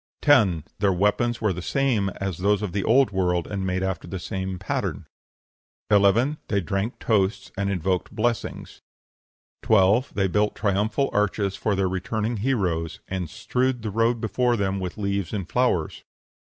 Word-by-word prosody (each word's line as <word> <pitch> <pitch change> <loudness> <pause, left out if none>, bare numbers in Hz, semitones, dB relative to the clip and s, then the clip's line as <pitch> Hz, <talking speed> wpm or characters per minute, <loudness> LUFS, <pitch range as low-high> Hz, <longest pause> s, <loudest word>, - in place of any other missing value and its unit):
10. 105 - +4 0.2
Their 100 -1 +3
weapons 105 +6 +1
were 105 -3 +1
the 90 - -6
same 120 -3 +1
as 95 -3 -3
those 105 +2 +2
of 100 - -2
the 100 0 -1
Old 130 +2 +4
World, 90 -3 0
and 95 -2 -3
made 95 0 -1
after 95 -3 -3
the 95 - -5
same 95 +1 -4
pattern. - - -3 0.9
11. 105 +8 +4
They 100 - +1
drank 100 +4 -2
toasts 100 -2 0
and 100 0 -1
invoked 95 -1 -1
blessings. 115 +1 -3 0.8
12. 110 +5 +3
They 95 -1 +2
built 105 +3 +1
triumphal 105 +6 0
arches 100 -1 0
for 105 0 0
their 95 -1 +1
returning 110 +5 -2
heroes, 95 -9 -1
and 95 -4 -3
strewed 125 +6 -1
the 110 - -3
road 115 +3 +1
before 120 +2 +1
them 95 -1 -1
with 90 +1 -5
leaves 100 -3 -2
and 95 -5 -3
flowers. 120 -11 0
100 Hz, 160 wpm, -24 LUFS, 95-110 Hz, 0.9 s, 10